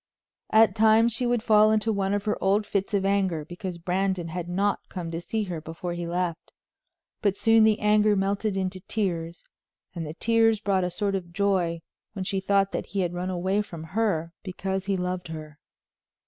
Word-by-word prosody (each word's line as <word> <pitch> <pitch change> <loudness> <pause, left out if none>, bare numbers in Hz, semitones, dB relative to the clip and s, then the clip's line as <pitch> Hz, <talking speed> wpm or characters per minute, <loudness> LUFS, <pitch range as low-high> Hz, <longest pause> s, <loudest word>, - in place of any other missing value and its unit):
At 220 0 +5
times 220 +1 +5
she 245 +3 -1
would 240 -2 +1
fall 215 -1 +5
into 220 +1 +1
one 195 0 0
of 205 +1 -3
her 210 - +1
old 200 +2 +2
fits 200 0 -2
of 195 -1 +1
anger 190 -6 +1
because 175 +2 -6
Brandon 180 0 -1
had 175 +1 -5
not 200 +3 -1
come 175 -3 -5
to 165 +1 -4
see 220 +5 -2
her 175 -5 -5
before 165 +2 -5
he 175 0 -4
left, 175 -1 -3 0.7
but 200 -2 +1
soon 225 +1 +5
the 215 -1 +3
anger 210 0 +4
melted 200 +1 0
into 185 0 -2
tears, 175 -4 -3 0.5
and 170 - -4
the 155 0 -6
tears 225 0 +3
brought 195 -3 +1
a 180 - 0
sort 200 +3 -2
of 180 -3 -4
joy 180 -4 0 0.3
when 190 -3 -4
she 195 0 -1
thought 195 0 +2
that - - -3
he 200 - -2
had 175 -1 -1
run 180 +1 -3
away 185 +3 0
from 170 -6 -8
her 180 -7 0
because 190 0 -4
he 195 -1 +1
loved 180 0 -3
her. 155 -2 -8
195 Hz, 195 wpm, -26 LUFS, 175-210 Hz, 0.7 s, At